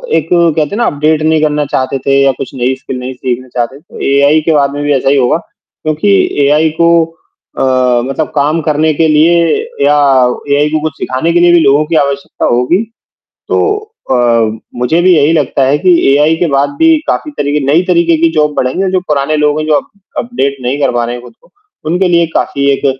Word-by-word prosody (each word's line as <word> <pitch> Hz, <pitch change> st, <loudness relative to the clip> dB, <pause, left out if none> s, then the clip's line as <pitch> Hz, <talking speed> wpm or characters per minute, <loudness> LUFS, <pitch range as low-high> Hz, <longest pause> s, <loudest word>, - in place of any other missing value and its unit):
एक -, -, 0 dB
कहते 165 Hz, -3 st, +1 dB
हैं 205 Hz, -, -5 dB
ना 240 Hz, -, +1 dB
अपडेट 150 Hz, +2 st, 0 dB
नहीं 155 Hz, 0 st, +1 dB
करना 150 Hz, -1 st, 0 dB
चाहते 135 Hz, -1 st, -2 dB
थे 135 Hz, +1 st, +1 dB
या 135 Hz, -, +3 dB
कुछ -, -, -7 dB
नई 130 Hz, +1 st, -1 dB
स्किल 130 Hz, 0 st, -7 dB
नहीं 130 Hz, +1 st, -6 dB
सीखना 130 Hz, 0 st, -4 dB
चाहते, 120 Hz, +3 st, -3 dB
तो 160 Hz, -, -15 dB
एआई 140 Hz, +3 st, +3 dB
के 160 Hz, -, 0 dB
बाद 140 Hz, -2 st, +1 dB
में 145 Hz, 0 st, -4 dB
भी 145 Hz, 0 st, +1 dB
ऐसा 135 Hz, 0 st, 0 dB
ही 140 Hz, -, +2 dB
होगा 125 Hz, +3 st, +2 dB
क्योंकि 155 Hz, -6 st, -5 dB, 0.4 s
एआई 150 Hz, +3 st, +2 dB
को 170 Hz, -, +4 dB, 0.7 s
अ, 125 Hz, -2 st, +1 dB
मतलब 135 Hz, +4 st, -3 dB
काम 150 Hz, +3 st, +1 dB
करने 155 Hz, +1 st, 0 dB
के 160 Hz, +2 st, +1 dB
लिए 155 Hz, +3 st, +3 dB, 0.5 s
या 145 Hz, +1 st, +3 dB, 0.6 s
एआई 145 Hz, +1 st, +2 dB
को 155 Hz, 0 st, -1 dB
कुछ 155 Hz, -1 st, -3 dB
सिखाने 130 Hz, +6 st, -2 dB
के 175 Hz, -, +3 dB
लिए 175 Hz, 0 st, +4 dB
भी 175 Hz, -, +5 dB
लोगों 145 Hz, 0 st, +3 dB
की 165 Hz, +2 st, -3 dB
आवश्यकता 140 Hz, -2 st, -1 dB
होगी, 125 Hz, -, +1 dB, 0.7 s
तो 420 Hz, -1 st, +1 dB, 0.3 s
अ, -, -, +3 dB, 0.6 s
मुझे 125 Hz, +8 st, +1 dB
भी 185 Hz, 0 st, +4 dB
यही 155 Hz, 0 st, +3 dB
लगता 145 Hz, -3 st, 0 dB
है 140 Hz, +2 st, +1 dB
कि 185 Hz, +3 st, +1 dB, 0.2 s
एआई 150 Hz, +3 st, +2 dB
के 175 Hz, -, 0 dB
बाद 140 Hz, 0 st, 0 dB
भी 325 Hz, 0 st, +4 dB
काफ़ी 305 Hz, -, -2 dB
तरीके 145 Hz, +1 st, -1 dB
नई 155 Hz, +5 st, +3 dB
तरीके 170 Hz, -2 st, +2 dB
की 165 Hz, -, +5 dB
जॉब 150 Hz, -1 st, 0 dB
बढ़ेंगी 130 Hz, +9 st, -1 dB
और 190 Hz, -, -1 dB
जो 185 Hz, 0 st, 0 dB
पुराने 150 Hz, +1 st, 0 dB
लोग 150 Hz, 0 st, +1 dB
हैं, 155 Hz, -, -3 dB
जो 155 Hz, -, +2 dB
अप -, -, -1 dB, 0.3 s
अपडेट 140 Hz, -, -2 dB
नहीं 125 Hz, +3 st, -2 dB
कर 140 Hz, -, +1 dB
पा 120 Hz, -1 st, -1 dB
रहे 120 Hz, +1 st, -4 dB
हैं 120 Hz, -, -8 dB
खुद 120 Hz, -, -13 dB
को, -, -, -26 dB, 0.4 s
उनके 180 Hz, +2 st, +1 dB
लिए 170 Hz, -1 st, +2 dB
काफ़ी 140 Hz, 0 st, 0 dB
एक 140 Hz, -, -2 dB
150 Hz, 220 wpm, -11 LUFS, 135-160 Hz, 0.7 s, भी